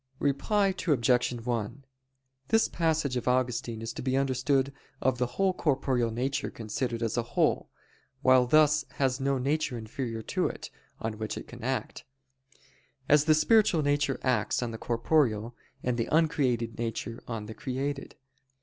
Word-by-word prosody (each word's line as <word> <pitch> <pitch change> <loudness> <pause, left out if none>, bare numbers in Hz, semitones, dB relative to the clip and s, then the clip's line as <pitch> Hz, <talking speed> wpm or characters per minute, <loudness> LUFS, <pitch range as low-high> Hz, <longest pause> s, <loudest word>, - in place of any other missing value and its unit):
Reply 195 +10 +1 0.2
Obj. 125 -4 +3
1: 120 +2 -4 0.6
This 225 +6 +3
passage 160 -5 0
of 125 - -4
Augustine 125 -2 0
is 115 - -4
to - - -6
be 130 +1 0
understood 135 0 +1 0.3
of 130 -2 +1
the 125 - +1
whole 195 -1 +3
corporeal 135 -7 +1
nature 125 +5 -2
considered 115 +2 -3
as 115 +1 -1
a - - +3 0.2
whole, - - +2 0.5
which 130 -1 +5
thus 155 0 +5
has 135 -1 +1
no 135 0 +1
nature 140 0 -1
inferior 115 0 -5
to - - 0
it, - - -7 0.3
on 110 -1 -4
which 110 0 -3
it - - -7
can - - -11
act; - - -3 1.0
as 150 0 +5
the 155 -1 +5
spiritual 170 0 +4
nature 145 -1 +1
acts 125 -2 +1
on 120 - -3
the 110 - -7
corporeal, 120 -2 +1 0.3
and 125 -1 -1
the 115 - -1
uncreated 135 -9 +1
nature 115 0 -4
on 115 -3 -4
the 110 - -7
created. 135 +4 -4
130 Hz, 155 wpm, -29 LUFS, 115-145 Hz, 1.0 s, which